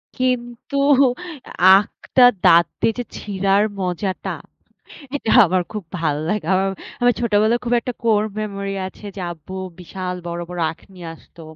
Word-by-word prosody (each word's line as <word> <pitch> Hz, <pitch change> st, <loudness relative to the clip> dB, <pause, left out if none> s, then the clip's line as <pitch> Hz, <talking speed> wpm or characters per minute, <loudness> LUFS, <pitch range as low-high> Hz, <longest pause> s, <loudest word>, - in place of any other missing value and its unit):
কিন্তু 250 Hz, 0 st, -2 dB, 0.9 s
আখটা 195 Hz, +6 st, +4 dB, 0.2 s
দাঁত 170 Hz, +1 st, +7 dB, 0.2 s
দিয়ে 225 Hz, -, +2 dB
যে -, -, -1 dB
ছিঁড়ার 195 Hz, 0 st, +1 dB, 0.2 s
মজাটা, 185 Hz, +1 st, -3 dB, 0.9 s
এটা 225 Hz, -, -3 dB, 0.2 s
আমার 185 Hz, +2 st, +1 dB
খুব 210 Hz, -, -4 dB, 0.2 s
ভাল্লাগে 160 Hz, +4 st, -1 dB
আমার, 195 Hz, +1 st, +1 dB, 0.3 s
আমার 245 Hz, 0 st, +4 dB
ছোটবেলায় 220 Hz, +1 st, +2 dB
খুব 240 Hz, -, 0 dB
একটা 250 Hz, -, -4 dB
কোর 215 Hz, -2 st, +3 dB, 0.2 s
মেমোরি 200 Hz, -2 st, -4 dB
আছে, 200 Hz, -, -15 dB
যে -, -, -4 dB
আব্বু 170 Hz, +3 st, -11 dB, 0.3 s
বিশাল 180 Hz, +1 st, -5 dB
বড়, 170 Hz, 0 st, -4 dB
বড়, 180 Hz, -1 st, -6 dB
আখ 160 Hz, -, -15 dB
নিয়ে 175 Hz, -2 st, -9 dB
আসতো। 165 Hz, -, -17 dB
195 Hz, 140 wpm, -20 LUFS, 180-220 Hz, 0.9 s, দাঁত